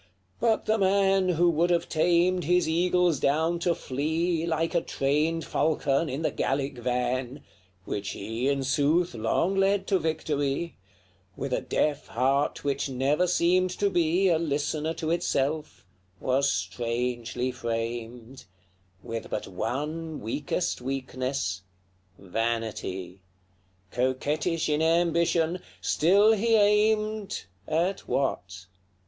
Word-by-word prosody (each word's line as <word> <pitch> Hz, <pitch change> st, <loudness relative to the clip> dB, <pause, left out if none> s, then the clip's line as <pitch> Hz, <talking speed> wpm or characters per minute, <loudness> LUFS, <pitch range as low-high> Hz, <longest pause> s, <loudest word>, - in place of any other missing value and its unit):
But 225 Hz, -2 st, +1 dB
the 220 Hz, +1 st, +1 dB
man 195 Hz, -1 st, +3 dB
Who 175 Hz, 0 st, +3 dB
would 170 Hz, +2 st, +1 dB
have 170 Hz, -1 st, +1 dB
tamed 175 Hz, +2 st, +2 dB
his 180 Hz, +2 st, +3 dB
eagles 175 Hz, -1 st, +2 dB
down 160 Hz, +6 st, +1 dB
to 170 Hz, 0 st, +1 dB
flee, 160 Hz, +5 st, -1 dB
Like 165 Hz, +1 st, 0 dB
a 170 Hz, -, +2 dB
trained 150 Hz, +4 st, 0 dB
falcon, 155 Hz, -1 st, +1 dB
in 140 Hz, +5 st, -3 dB
the -, -, +1 dB
Gallic 135 Hz, -1 st, -2 dB
van, 125 Hz, +2 st, -2 dB, 0.4 s
Which 100 Hz, -1 st, -3 dB
he, 115 Hz, +6 st, -2 dB
in 140 Hz, -1 st, 0 dB
sooth, 145 Hz, +6 st, +2 dB
long 120 Hz, -, 0 dB
led 195 Hz, 0 st, +2 dB
to 195 Hz, -1 st, +2 dB
victory, 155 Hz, -1 st, -2 dB, 0.6 s
With -, -, -3 dB
a -, -, 0 dB
deaf 150 Hz, -1 st, -1 dB
heart 135 Hz, +4 st, 0 dB
which 140 Hz, 0 st, -1 dB
never 140 Hz, +7 st, +1 dB
seemed 180 Hz, +1 st, +3 dB
to 200 Hz, -1 st, +1 dB
be 175 Hz, +3 st, +2 dB
A 165 Hz, -2 st, +3 dB
listener 155 Hz, +1 st, -1 dB
to 160 Hz, 0 st, -2 dB
itself, 155 Hz, -, -1 dB, 0.3 s
was 135 Hz, +1 st, +1 dB
strangely 120 Hz, +5 st, -2 dB
framed; 115 Hz, +1 st, -5 dB, 0.6 s
With 115 Hz, 0 st, -5 dB
but -, -, -3 dB
one 155 Hz, +4 st, -4 dB
weakest 140 Hz, -, -2 dB
weakness 130 Hz, -6 st, -3 dB, 0.6 s
vanity: 100 Hz, -3 st, -3 dB, 0.7 s
Coquettish 145 Hz, +7 st, 0 dB
in 150 Hz, 0 st, +1 dB
ambition, 170 Hz, +1 st, +2 dB, 0.2 s
still 200 Hz, +7 st, +4 dB
he 225 Hz, +1 st, +3 dB
aimed 215 Hz, -, +2 dB, 0.2 s
At 175 Hz, +5 st, -1 dB
what? 95 Hz, -9 st, -2 dB
155 Hz, 120 wpm, -27 LUFS, 130-175 Hz, 0.7 s, still